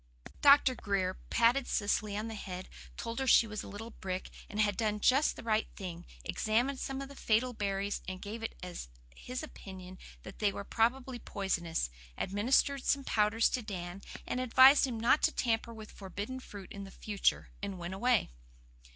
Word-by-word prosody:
Dr. 280 -2 +7
Grier 195 -5 -1 0.2
patted 240 +3 +3
Cecily 205 -1 0
on 215 +2 -3
the 225 - -5
head, 185 -3 -6 0.3
told 230 +2 -4
her 265 - -1
she 235 - +7
was 215 -1 -5
a - - -9
little 225 +3 -7
brick, 185 -3 -5 0.2
and 210 - -5
had 205 -2 +3
done 210 -1 0
just 270 +7 +4
the - - -9
right 220 -1 +1
thing, 175 -3 -7 0.2
examined 245 +5 +1
some 270 0 -3
of - - -7
the 280 - -12
fatal 245 +1 +1
berries 200 -1 -2
and 185 0 -4
gave 215 +4 -6
it 225 - -4
as 180 - -6 0.3
his 250 +3 -6
opinion 185 -9 -10 0.2
that 190 - -10
they 205 -2 +3
were 200 - -5
probably 245 +4 0
poisonous, 170 - -2 0.3
administered 255 +7 +2
some 280 -1 +2
powders 220 -1 +3
to 255 - -1
Dan 185 -3 -6 0.2
and 250 - -2
advised 260 +3 +7
him 235 -3 -4
not 235 +6 +4
to - - +4
tamper 230 -1 0
with 220 -2 -10
forbidden 205 +6 -6
fruit 200 -6 -10
in 200 -1 -7
future, 205 0 0
and 200 -1 -4
went 175 +1 -5
away. 235 - +2
215 Hz, 180 wpm, -32 LUFS, 195-250 Hz, 0.3 s, Dr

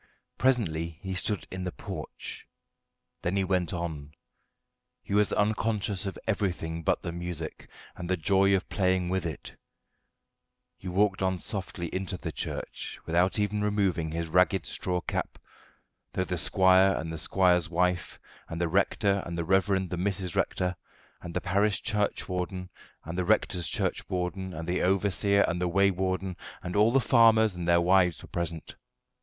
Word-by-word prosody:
Presently 85 -11 +1
he 95 -1 -3
stood 95 -2 -1
in 95 0 -4
the 90 - -3
porch, - - -8 0.7
then 90 +3 -1
he 100 - +2
went 90 -3 0
on; 80 -5 -5 0.9
he - - -5
was 105 0 +3
unconscious 105 -2 0
of 95 - -5
everything 90 -6 -1
but - - 0
the 85 - -3
music 85 -2 -5 0.3
and 90 0 -6
the 95 - +2
joy 95 +3 +3
of 95 - -2
playing 95 -2 +1
with 95 -1 0
it; 80 - -8 1.2
he 95 - -10
walked 95 +2 +1
on 95 -1 +1
softly 95 -1 -5
into 95 -1 -3
the 85 -2 -5
church - - -5
without 90 +4 +2
even 105 0 0
removing 100 -6 +1
his 85 +1 -3
ragged 90 +2 +3
straw 90 -1 -1
cap, - - -3 0.8
though 95 - 0
the 90 - -3
squire 95 +2 +5
and 80 +1 -4
the 80 - -5
squire's 90 -2 +3
wife, 90 0 0 0.3
and 80 - -5
the 85 - +1
rector 100 +2 +2
and 85 0 -5
the 85 - -2
reverend 95 0 +2
the 90 - -2
Mrs. 95 -1 -1
Rector, 90 0 0 0.5
and 85 - -8
the - - 0
parish 100 +2 +1
churchwarden 90 -4 -2 0.3
and 85 +3 -4
the - - +1
rector's 90 -4 +2
churchwarden, 95 +1 -2
and 80 -1 -6
the 90 +1 0
overseer 100 +1 +3
and 90 +1 -2
the 90 - +1
waywarden, 95 0 +1 0.3
and 90 +1 -4
all 105 +3 +5
the 135 - +4
farmers 110 -5 +5
and 85 -1 -4
their 85 0 +5
wives 90 -1 +3
were - - -12
present. 85 -2 -4
95 Hz, 160 wpm, -28 LUFS, 85-100 Hz, 1.2 s, squire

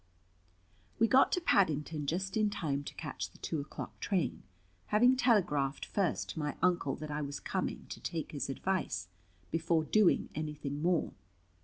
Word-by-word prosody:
We 230 - +4
got 260 +3 +5
to - - +3
Paddington 155 - +2
just 190 +5 -1
in 215 -1 +3
time 145 -8 -2
to - - -7
catch - - -4
the - - -19
two 155 - -2
o'clock 140 - -8
train, 175 -11 0 0.5
having 245 +5 +5
telegraphed 170 - +2
first 195 -4 0
to - - -5
my 150 -1 -2
Uncle 175 -7 +2
that 155 0 -6
I 150 +1 -2
was 140 -1 -4
coming - - -3
to - - -6
take 165 -2 -4
his 145 -2 -3
advice, 135 - -2 0.4
before 165 0 +2
doing 205 +3 +3
anything 150 -2 -4
more. 175 0 +1
160 Hz, 160 wpm, -33 LUFS, 145-190 Hz, 0.5 s, got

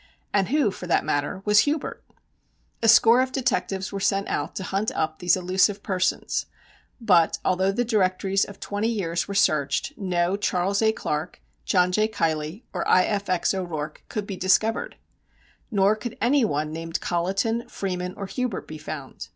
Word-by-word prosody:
And 195 -2 +2
who, 280 -6 +2
for 180 - -8
that - - +2
matter, 145 +6 -1
was 210 0 +5
Hubert? 290 +4 -1 0.8
A 225 - +2
score 225 +2 +7
of 260 0 -1
detectives 240 -7 -1
were 200 - -4
sent 195 0 +1
out - - -2
to 195 - -4
hunt 195 +4 -1
up 155 0 -1
these 180 0 +3
elusive 190 +3 +1
persons, 185 -1 -1 0.5
but, 180 -8 +3
although 190 +1 +2
the 245 +5 -1
directories 195 -3 +1
of 200 - -8
twenty 205 +2 -2
years 180 -7 -1
were 200 - -5
searched, 155 - +1
no 180 -2 0
Charles 200 0 0
A. 220 0 +4
Clark, 155 -5 -4 0.3
John 180 -1 +3
J. 215 +3 +2
Keilly 165 0 -2
or - - -2
I. 185 - +5
F. 200 -1 -2
X. 180 +1 +1
O'Rourke 160 -5 -4
could 210 -2 -3
be 200 - -5
discovered. 215 +5 +1 0.7
Nor 200 -2 +3
could 230 +1 -7
any 260 +4 +3
one 155 -6 -1
named 165 +1 -4
Colliton, 195 +7 -1
Freeman 180 -2 -4
or 200 - -4
Hubert 235 +2 -3
be 155 0 -8
found. 150 -3 -7
195 Hz, 170 wpm, -25 LUFS, 175-215 Hz, 0.8 s, score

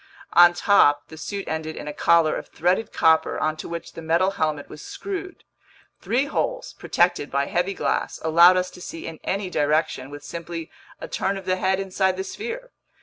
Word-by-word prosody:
On 175 0 +8
top, 145 -7 +4
the 160 - -10
suit 195 +5 -5
ended 160 0 -3
in - - -7
a 150 - -4
collar 165 -1 +3
of - - -6
threaded 180 +6 0
copper 160 0 +3
onto 155 0 -2
which 170 0 -6
the - - -8
metal 170 +4 +2
helmet 155 -6 -2
was 150 - -11
screwed. 380 - -6 0.6
Three 250 +5 0
holes, - - -2
protected 175 -4 0
by 140 0 0
heavy 180 +6 -1
glass, - - -1
allowed 170 +3 +6
us 180 0 -1
to 180 - -13
see 165 - -7
in 165 -1 -7
any 195 -1 -2
direction 150 -3 0
with 145 0 -10
simply 165 0 -7 0.3
a - - -6
turn 195 +1 -1
of 195 - -9
the 185 0 +1
head 190 0 +1
inside 190 -1 0
the 190 - -2
sphere. 475 - -6
175 Hz, 190 wpm, -24 LUFS, 160-195 Hz, 0.6 s, On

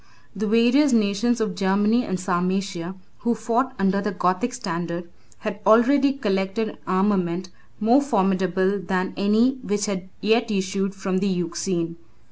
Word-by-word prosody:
] - - -34
The 215 +2 -2
various 245 +6 +4
nations 225 +2 +2
of 215 -3 -1
Germany 205 +5 +2
and 185 -5 -3
Sarmatia, 185 0 -2 0.2
who 235 0 0
fought 235 +4 -1
under 195 +1 +1
the 210 +1 -2
Gothic 190 +5 0
standard, 175 -7 -4 0.3
had 210 -1 -4
already 260 +7 +5
collected 205 -3 -1
an - - -12
armament 185 -2 0 0.3
more 235 +6 +4
formidable 190 -5 +1
than 185 0 -2
any 220 +7 +2
which 205 -3 -1
had 190 -3 -4
yet 225 +3 +2
issued 195 -1 -1
from 190 -1 -1
the 200 - 0
Euxine. 170 -1 -2
200 Hz, 145 wpm, -23 LUFS, 185-225 Hz, 0.3 s, already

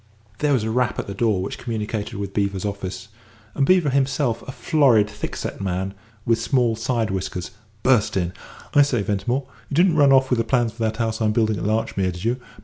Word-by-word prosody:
There 150 -1 +2
was 125 -5 +2
a 110 - -1
rap 125 -1 0
at - - -3
the 100 - -6
door 105 -3 +1
which 100 - -5
communicated 110 -2 -4
with 100 -1 -5
Beevor's 100 -1 -1
office, 95 0 -5 0.4
and 135 -1 +1
Beevor 180 -6 +4
himself, 135 -2 +1
a - - -4
florid, 130 -8 +3
thick 105 0 -6
set - - -5
man, 95 0 -2 0.3
with 115 -1 +2
small 120 -2 +2
side 115 -2 -1
whiskers, 90 -2 -4 0.3
burst 125 -7 +3
in. 90 -1 -1 0.4
"I 145 - +7
say, 130 -7 +2
Ventimore, 105 +7 -1 0.2
you 140 - -3
didn't 170 0 +4
run 140 -2 +6
off 130 0 +4
with 125 - +3
the - - +2
plans 120 -3 +1
for 115 - -11
that 110 -1 0
house 115 -1 -1
I'm 105 -1 +2
building 110 -2 +1
at - - -4
Larchmere, 105 -3 0
did 90 +1 -8
you? 120 +2 +1
115 Hz, 215 wpm, -22 LUFS, 100-130 Hz, 0.4 s, I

